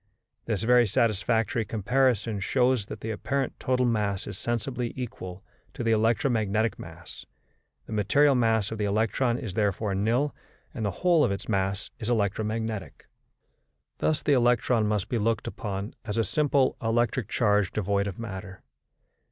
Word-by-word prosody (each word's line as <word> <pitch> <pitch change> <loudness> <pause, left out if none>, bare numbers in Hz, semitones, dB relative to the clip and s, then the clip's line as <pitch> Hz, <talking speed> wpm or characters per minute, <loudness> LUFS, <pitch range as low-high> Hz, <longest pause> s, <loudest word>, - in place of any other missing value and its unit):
This 110 -2 -1
very 120 0 +5
satisfactory 110 +1 +1
comparison 115 0 +1
shows 125 0 +1
that - - -8
the 110 - -3
apparent 135 +5 -2
total 125 -1 +1
mass 105 -5 0
is 100 - -6
sensibly 120 +3 -3
equal 110 -8 -7 0.3
to - - -4
the 115 - +2
electromagnetic 110 -1 +1
mass; 80 +1 -10 0.6
the - - -7
material 140 +8 +4
mass 115 -4 +2
of 110 - -5
the 105 - +1
electron 115 +4 +1
is 110 -7 -5
therefore 105 0 0
nil, 115 +9 +1 0.4
and 115 - -4
the 100 - +1 0.2
whole 170 -4 +5
of - - +2
its 100 - -4
mass 95 -1 -1
is 110 - -3
electromagnetic. 110 -1 -2 0.9
Thus 155 - 0
the 145 - +3
electron 120 -3 +3
must 105 -3 0
be 120 - -1
looked 115 +1 0
upon 100 -3 -4
as 105 -1 -4
a 115 - +3
simple 140 - +2
electric 120 0 0
charge 105 -4 +2
devoid 100 -1 0
of 100 - -5
matter. 95 -4 -7
110 Hz, 150 wpm, -27 LUFS, 100-120 Hz, 0.9 s, very